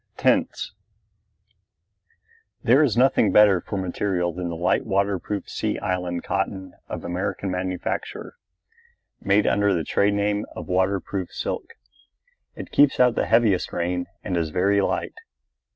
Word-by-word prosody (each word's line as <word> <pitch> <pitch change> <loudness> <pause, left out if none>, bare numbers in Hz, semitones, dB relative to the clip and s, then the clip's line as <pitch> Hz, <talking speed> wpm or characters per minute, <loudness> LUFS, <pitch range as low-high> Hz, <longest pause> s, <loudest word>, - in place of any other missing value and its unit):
TENTS - - +1 1.9
There 125 +5 +5
is 130 -7 +2
nothing 125 -4 +4
better 105 -4 +6
for 100 - -5
material 90 -1 -1
than 90 0 -4
the 85 - -4
light 85 +2 +1
waterproof 100 +1 -1
Sea - - -2
Island 90 -2 -2
cotton 95 0 -3 0.2
of - - -5
American 95 +2 -3
manufacture, 95 - -4 0.9
made 100 +2 +3
under 100 -1 +2
the 85 - -1
trade 100 +4 +1
name 105 +1 0
of - - -7
waterproof 95 0 -1
silk. - - -5 0.8
It - - -9
keeps 145 -1 +4
out 125 -1 +5
the - - -1
heaviest 110 -6 +2
rain 90 +1 -2 0.2
and 95 -4 -2
is 85 -2 0
very 100 +5 +2
light. - - -1
95 Hz, 135 wpm, -24 LUFS, 90-105 Hz, 1.9 s, better